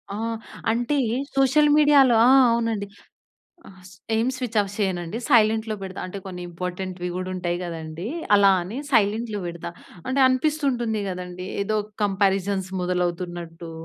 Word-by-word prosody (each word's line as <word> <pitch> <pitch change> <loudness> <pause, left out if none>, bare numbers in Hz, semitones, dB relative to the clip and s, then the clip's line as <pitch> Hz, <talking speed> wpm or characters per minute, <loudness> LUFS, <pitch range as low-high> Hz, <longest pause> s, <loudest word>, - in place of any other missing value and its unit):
ఆ! - - -4 0.5
అంటే 240 +5 0 0.4
సోషల్ 275 +3 +4
మీడియాలో 285 -5 +6
ఆ! - - +6 0.2
అవునండి. 230 -3 -1 0.8
ఆహ్, 190 -1 -16 0.3
ఏం 225 +2 +1
స్విచ్ 245 -3 -4
ఆఫ్ 200 -1 -3
చేయనండి. 185 -1 -2
సైలెంట్‌లో 220 -3 +3
పెడతా. 190 -1 -6
అంటే 185 +2 -7
కొన్ని 180 -2 -7
ఇంపార్టెంట్‌వి 180 +1 -5
గూడా 185 0 -4
ఉంటాయి 175 -1 -2
గదండీ! 165 0 -6 0.3
అలా 200 -1 +6
అని 190 +7 -7
సైలెంట్‌లో 220 -2 +1
పెడతా. 170 0 -6 0.4
అంటే 260 +2 0
అనిపిస్తుంటుంది 255 -5 0
గదండీ! 180 0 -6 0.2
ఏదో 215 +2 -1 0.3
కంపారిజన్స్ 195 -1 +1
మొదలవుతున్నట్టూ, 175 -2 -3
200 Hz, 125 wpm, -24 LUFS, 180-230 Hz, 0.8 s, మీడియాలో